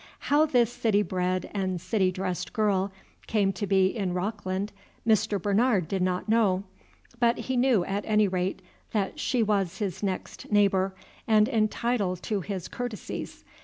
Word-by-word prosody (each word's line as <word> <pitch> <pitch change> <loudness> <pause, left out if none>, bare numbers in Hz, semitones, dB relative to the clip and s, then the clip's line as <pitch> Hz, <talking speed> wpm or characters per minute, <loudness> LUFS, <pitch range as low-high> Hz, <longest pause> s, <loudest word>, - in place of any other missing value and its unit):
How 300 +2 +3
this 245 -5 +2
citybred 185 -4 0
and 190 -3 -1
city 185 +1 +1
dressed 185 -2 -3
girl 200 -4 +1 0.4
came 200 -3 +2
to 205 +2 -3
be 190 0 +3
in 195 -5 -1
Rockland 200 +1 -2 0.3
Mr. 215 -2 +3
Bernard 205 -1 +2
did 190 +2 -1
not 180 +1 0
know, 210 -4 +3 0.6
but 235 0 +3
he 260 - -3
knew 245 -7 +3
at 200 +1 -2
any 210 -1 +4
rate 185 0 -2 0.3
that 200 -3 -1
she 245 -3 +1
was 195 -4 0
his 190 -3 -3
next 195 +1 -4
neighbor 195 -2 +3 0.3
and 215 -1 +5
entitled 215 -5 0
to 210 -3 -1
his 185 -1 -4
courtesies. 245 -4 -6
200 Hz, 150 wpm, -27 LUFS, 185-220 Hz, 0.6 s, and